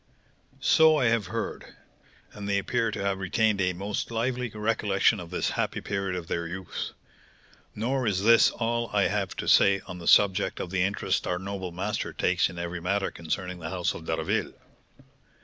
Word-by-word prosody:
"So 160 -1 +5
I 130 - +2
have 115 -4 +1
heard; - - -5 0.6
and 100 -1 -6
they 100 - +2
appear 115 +3 0
to 100 - -4
have 100 -1 -1
retained 100 +2 +1
a 90 0 +1
most 100 +3 -3
lively 120 +2 -1
recollection 105 -1 +1
of 85 -2 -8
this 90 - -1
happy - - -1
period 100 -2 -3
of 90 -2 -5
their 85 0 -3
youth. 95 +1 -5 0.8
Nor 125 +3 -1
is 95 -2 0
this 115 +1 +6
all 115 0 -2
I 100 -1 +3
have 100 -1 -1
to - - -5
say 100 0 +5
on 90 -1 -9
the 85 - -8
subject 100 0 +4
of 90 - -5
the 95 -1 0
interest 100 +3 0
our 90 - 0
noble 95 -1 -5
master 95 +5 -3
takes - - +1
in 85 - -10
every 85 0 -4
matter 100 +3 0
concerning 90 +2 -4
the 80 -1 -5
house 90 0 -1
of 80 - -9
D'Harville. - - -1
100 Hz, 185 wpm, -27 LUFS, 90-110 Hz, 0.8 s, this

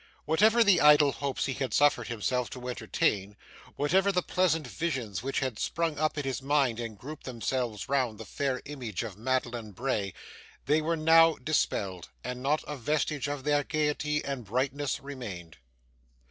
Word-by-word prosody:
Whatever 220 +9 +5
the 200 -5 +5
idle 150 -1 +7
hopes 140 -1 -2
he 135 - -1
had 130 0 -2
suffered 145 0 +3
himself 120 +2 -1
to 125 -1 -8
entertain, 105 -4 -1 0.4
whatever 190 +7 +2
the 180 -2 +1
pleasant 165 -4 +1
visions 125 - -3
which 135 +3 -2
had 130 -5 -2
sprung 165 -3 -1
up 155 0 0
in 145 - -1
his 135 -1 -3
mind 135 -4 +1
and 115 -3 -5
grouped 150 +8 -9
themselves 120 -3 -3
round 130 -5 0
the 110 - -7
fair 130 +4 -2
image 125 -10 -5
of 110 -5 -6
Madeline 120 -1 -2
Bray, 105 -4 -2 0.5
they 155 +2 +3
were 165 +2 0
now 165 +1 +6
dispelled, 95 - -1
and 125 0 -5
not 145 +4 +1
a 150 - -5
vestige 150 +2 -1
of 145 -2 -4
their 145 0 +2
gaiety 150 0 -1
and 135 -3 -3
brightness 130 +5 -1
remained. 105 - -8
135 Hz, 165 wpm, -29 LUFS, 120-150 Hz, 0.5 s, idle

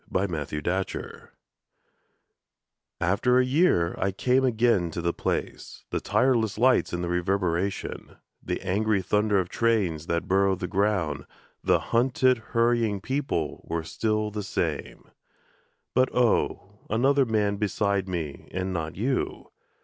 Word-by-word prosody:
IN 95 -1 -1
A 75 -3 -2
SUBWAY 75 -2 -4
STATION 95 0 -4 1.8
AFTER 100 +8 +2
a 130 - +4
year 130 - +3
I 100 - +1
came 125 +7 +2
again 115 -7 +2
to 80 - -5
the 85 0 0
place; - - -4
The - - 0
tireless 115 -6 +1
lights 125 +2 +3
and 90 0 -3
the - - -2
reverberation, 90 +1 -1 0.3
The - - -3
angry 105 +1 +1
thunder 105 +2 +2
of 90 -1 -2
trains 95 -9 0
that 85 -1 -1
burrow 95 0 +3
the 90 - -5
ground, 95 -5 0 0.4
The - - +4 0.2
hunted, 125 +1 +3 0.2
hurrying 115 -3 +2
people 130 - -2
were 85 0 -1
still 110 +4 -1
the 105 0 -4
same 100 - -3 0.9
But 130 +1 +3
oh, 105 -4 +1
another 135 +4 +3
man 105 -2 +1
beside 100 -2 0
me 80 -6 -5
and 95 0 -3
not 80 -2 -3
you! 125 +6 -2
100 Hz, 135 wpm, -26 LUFS, 90-115 Hz, 1.8 s, a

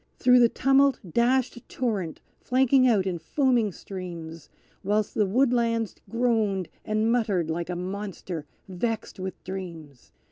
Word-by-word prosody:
Through 250 0 +5
the 235 -1 +6
tumult 270 +2 +3
dashed 245 +7 +1
a - - -10
torrent 205 -10 -3 0.2
flanking 260 0 +3
out 210 -6 +3
in 180 -3 -2
foaming 240 - +1
streams, 170 -4 -8 0.3
Whilst 210 0 0
the 210 - +2
woodlands 230 -1 +1 0.2
groaned 220 -6 0
and 215 +1 +1
muttered 200 -9 +1
like 170 +2 -3
a 180 - -2
monster 185 -3 -5 0.2
vexed 205 +3 -3
with 185 0 -6
dreams. 165 -8 -8
210 Hz, 135 wpm, -26 LUFS, 180-240 Hz, 0.3 s, the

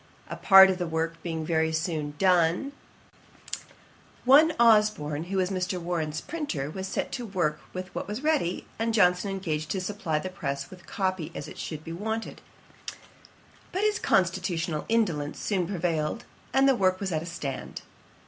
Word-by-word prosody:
A - - -3
part 190 -1 +8
of 185 - -3
the 175 - -1
work 165 +1 -2
being 160 -2 -3
very 160 0 +1
soon 160 -2 -2
done, 180 - +3 1.5
one 295 +5 +7
Osborn, 210 -10 +3
who 190 +2 -3
was 185 0 +1
Mr. 185 -1 -1
Warren's 160 -3 -2
printer, 285 - -4
was 190 +3 -5
set - - -3
to 245 - -4
work 170 -6 -1
with 185 0 -7
what - - -4
was 210 +7 -5
ready, 300 - 0
and 225 0 0
Johnson 180 -1 +3
engaged 160 -6 -3
to 190 - -1
supply 185 -4 -2
the 185 +5 -3
press 140 -6 -4
with 180 -2 -13
copy 185 -5 -2
as - - -5
it - - -10
should 155 -1 -5
be 165 - -6
wanted; 220 +5 -4 1.3
but 380 +3 -1
his 425 +1 +2
constitutional 175 - 0
indolence 170 -11 0
soon 185 -5 -1
prevailed, 170 +1 -1 0.3
and 270 +1 +4
the 270 - +6
work 185 -5 +2
was 195 -2 -3
at 155 -2 0
a 170 - -7
stand. 150 -6 -5
180 Hz, 165 wpm, -27 LUFS, 160-205 Hz, 1.5 s, part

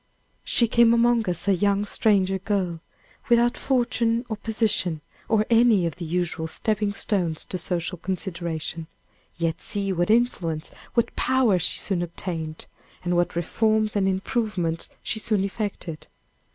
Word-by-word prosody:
She 235 - +2
came 235 +1 +5
among 235 -3 +3
us 175 +2 -3
a 200 - +5
young 200 +2 +1
stranger 195 -3 +2
girl, 185 -4 -1 0.5
without 240 0 +4
fortune 235 -2 +1
or 220 - -1
position, 210 -7 0 0.3
or 215 -1 +3
any 225 -5 +5
of 165 - -3
the 175 - -5
usual 165 -1 -1
stepping 210 +4 0
stones 180 -6 -1
to 185 - -4
social 175 0 -2
consideration. 170 -3 -4 0.5
Yet 165 0 -1
see 195 -1 -2
what 175 +1 0
influence, 185 -9 +1 0.2
what 235 - +1
power 250 -8 +3
she 170 - +1
soon 190 -4 0
obtained, 165 -2 -5 0.4
and 175 0 0
what 175 -1 +1
reforms 215 +5 +1
and 195 -2 +2
improvements 190 -4 -1
she 220 - -2
soon 215 -3 +1
effected. 195 -6 -4
195 Hz, 140 wpm, -25 LUFS, 175-220 Hz, 0.5 s, came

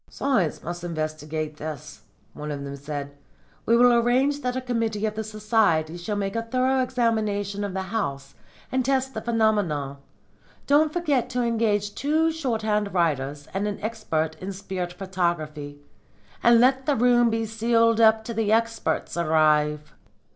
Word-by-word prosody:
'Science 235 - 0
must 175 +1 -5
investigate 155 -2 -4
this,' 155 -1 -7 0.3
one 150 0 -7
of 145 -1 -4
them 140 0 -6
said. 145 0 -6 0.5
'We 230 - +5
will 245 0 +6
arrange 255 +5 +2
that 250 -1 -2
a - - 0
committee 230 -4 -1
of 215 - -1
the 220 +1 -4
Society 215 -7 +1
shall 175 +5 -4
make 195 0 -2
a 230 - 0
thorough 255 +3 +1
examination 215 -5 -1
of 200 -2 -4
the 190 - -2
house 140 -11 -4 0.4
and 260 0 +1
test 265 0 0
the - - -4
phenomena. 205 - 0 0.7
Don't 300 +2 +4
forget 290 -8 0
to 250 -1 -1
engage 215 -3 0
two 315 +5 +1
shorthand 220 - -1
writers 145 -4 0
and 200 +2 -1
an 205 - -4
expert 165 -8 -2
in 190 +2 -4
spirit 185 -2 -5
photography. 170 -6 -3 0.6
And 235 0 +6
let 260 +2 +3
the 290 - +3
room 240 0 +4
be 225 0 -1
sealed 230 +1 +2
up 220 0 +5
till 230 - -5
the 215 -2 +1
experts 230 0 0
arrive.' 155 -2 +2
210 Hz, 155 wpm, -25 LUFS, 160-235 Hz, 0.7 s, will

